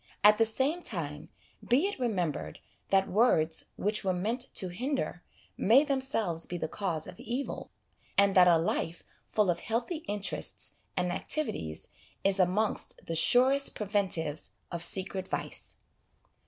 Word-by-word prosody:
At 210 Hz, +1 st, +7 dB
the 225 Hz, -, +6 dB
same 270 Hz, +10 st, 0 dB
time, 150 Hz, -, -4 dB, 0.3 s
be 260 Hz, +9 st, +3 dB
it 405 Hz, -7 st, -2 dB
remem 190 Hz, -, 0 dB
bered -, -, -7 dB, 0.3 s
that 195 Hz, 0 st, +3 dB
words 165 Hz, -7 st, +3 dB
which 210 Hz, +2 st, -1 dB
were 190 Hz, -1 st, +1 dB
meant 230 Hz, +8 st, -2 dB
to 185 Hz, -, +2 dB
hinder 250 Hz, -1 st, -3 dB, 0.4 s
may 245 Hz, +8 st, +5 dB
themselves 260 Hz, -, -1 dB
be 175 Hz, -, -4 dB
the 160 Hz, -, -2 dB
cause 165 Hz, -3 st, -3 dB
of -, -, -10 dB
evil, 250 Hz, +5 st, -4 dB, 0.5 s
and 200 Hz, 0 st, +5 dB
that 180 Hz, -1 st, +7 dB
a 170 Hz, -1 st, +6 dB
life 165 Hz, 0 st, -2 dB, 0.2 s
full 210 Hz, -4 st, +2 dB
of 170 Hz, -, -3 dB
healthy 235 Hz, -, -2 dB
interests 205 Hz, -1 st, -2 dB, 0.2 s
and 180 Hz, -1 st, +1 dB
activities 175 Hz, -, -2 dB, 0.4 s
is 195 Hz, 0 st, +2 dB
amongst 190 Hz, +4 st, 0 dB
the 165 Hz, -, -3 dB
surest 255 Hz, -, +4 dB
preventives 185 Hz, -7 st, -1 dB, 0.2 s
of 170 Hz, -2 st, -3 dB
secret 190 Hz, +1 st, 0 dB
vice. -, -, -5 dB
195 Hz, 145 wpm, -30 LUFS, 175-240 Hz, 0.5 s, At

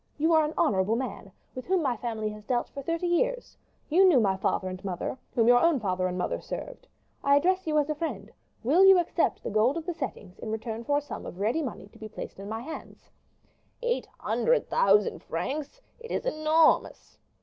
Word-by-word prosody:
You 320 Hz, +3 st, +2 dB
are 315 Hz, -1 st, +5 dB
an 300 Hz, +1 st, -3 dB
honorable 195 Hz, +2 st, +2 dB
man, 235 Hz, -5 st, -5 dB, 0.2 s
with 255 Hz, -, -8 dB
whom 370 Hz, -2 st, +2 dB
my 260 Hz, -4 st, +1 dB
family 220 Hz, -2 st, -3 dB
has 210 Hz, 0 st, -9 dB
dealt 240 Hz, +2 st, -1 dB
for 280 Hz, -, -7 dB
thirty 330 Hz, +5 st, -2 dB
years; -, -, 0 dB, 0.3 s
you 350 Hz, +5 st, +4 dB
knew 355 Hz, -9 st, +6 dB
my 195 Hz, -4 st, +2 dB
father 190 Hz, 0 st, -1 dB
and 185 Hz, 0 st, -6 dB
mother, 185 Hz, +3 st, -3 dB, 0.2 s
whom 230 Hz, -1 st, +3 dB
your 245 Hz, 0 st, +7 dB
own 335 Hz, -5 st, +3 dB
father 185 Hz, -4 st, -1 dB
and 180 Hz, 0 st, -4 dB
mother 180 Hz, -, -2 dB
served. -, -, -7 dB, 0.4 s
I 280 Hz, 0 st, +5 dB
address 370 Hz, +5 st, +2 dB
you 305 Hz, -1 st, +1 dB
as 295 Hz, -1 st, +2 dB
a 305 Hz, -, 0 dB
friend; 320 Hz, +2 st, -5 dB, 0.3 s
will 305 Hz, +11 st, +4 dB
you 385 Hz, -1 st, +8 dB
accept 345 Hz, -1 st, 0 dB
the -, -, -4 dB
gold 225 Hz, +8 st, +2 dB
of 325 Hz, -, -5 dB
the 355 Hz, -, -2 dB
settings 225 Hz, -, -7 dB
in 220 Hz, -, -6 dB
return 220 Hz, +1 st, -4 dB
for 285 Hz, +3 st, +2 dB
a -, -, 0 dB
sum 290 Hz, -, -8 dB
of -, -, -8 dB
ready 225 Hz, +10 st, +1 dB
money 255 Hz, -9 st, -5 dB
to -, -, -19 dB
be 220 Hz, -, -8 dB
placed 210 Hz, -, -8 dB
in 200 Hz, +1 st, -7 dB
my 225 Hz, +1 st, -4 dB
hands?" 315 Hz, +6 st, -10 dB, 0.7 s
"Eight 485 Hz, 0 st, -1 dB
hundred -, -, 0 dB
thousand 200 Hz, +1 st, +3 dB
francs! 280 Hz, -, -4 dB, 0.2 s
it 465 Hz, 0 st, -10 dB
is -, -, -2 dB
enormous." 315 Hz, -6 st, +2 dB
270 Hz, 215 wpm, -28 LUFS, 215-330 Hz, 0.7 s, you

